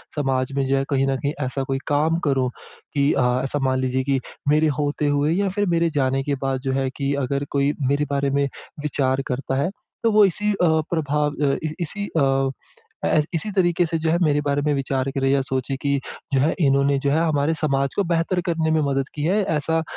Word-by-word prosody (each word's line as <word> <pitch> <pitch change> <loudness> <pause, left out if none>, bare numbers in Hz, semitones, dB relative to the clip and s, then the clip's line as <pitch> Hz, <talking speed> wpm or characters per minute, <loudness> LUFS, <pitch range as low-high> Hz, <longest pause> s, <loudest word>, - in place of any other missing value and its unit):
समाज 135 -3 0
में 135 - +1
जो 135 0 +2
है, 135 - +1
कहीं 135 -1 +1
न 135 -1 +1
कहीं 145 +2 -2
ऐसा 135 +1 -2
कोई 135 - +1
काम 155 +3 +2
करूँ 130 -2 +1 0.4
कि 140 0 +2
अ, - - +2 0.2
ऐसा 140 +2 -2
मान 130 - +1
लीजिए 130 0 0
कि 135 -1 +1 0.3
मेरे 155 +1 +4
होते 145 0 0
हुए 145 +2 +2
या 195 +2 +1
फिर 205 +2 0
मेरे 170 0 +2
जाने 135 +1 +1
के 140 0 -1
बाद 135 -1 0
जो 135 - +1
है 130 - 0
कि 140 0 0
अगर 140 +2 -2
कोई 140 +1 +2
मेरे 145 +2 +1
बारे 140 0 +1
में 140 0 +1 0.3
विचार 135 -3 0
करता 135 +1 -2
है, 145 - 0 0.3
तो 230 - +3
वो 210 -1 +6
इसी 210 +3 0
अ, - - -2 0.4
प्रभाव 150 -2 0
अ, 135 - +2
इसी 155 0 -3
इसी 200 +5 -4
अ, 135 -2 +2 0.6
ऐस 150 -1 +3
इसी 165 +6 -1
तरीके 175 -3 +2
से 165 0 -1
जो 160 - 0
है, 170 - +3
मेरे 145 -2 +2
बारे 145 0 +1
में 150 0 +1
विचार 135 -1 -1
करे 135 -1 0
या 135 0 +3
सोचे 130 0 -2
कि, 140 -1 +1 0.3
"जो 135 - +4
है, 150 +4 +2
इन्होंने 140 0 +3
जो 140 - +3
है, 155 - +3
हमारे 150 +1 +1
समाज 140 -3 0
को 200 - +2
बेहतर 170 +2 +1
करने 160 -2 0
में 160 - +3
मदद 135 0 0
की 150 - -4
है। 195 +7 +2
ऐसा 160 +2 +1
145 Hz, 225 wpm, -22 LUFS, 135-160 Hz, 0.6 s, वो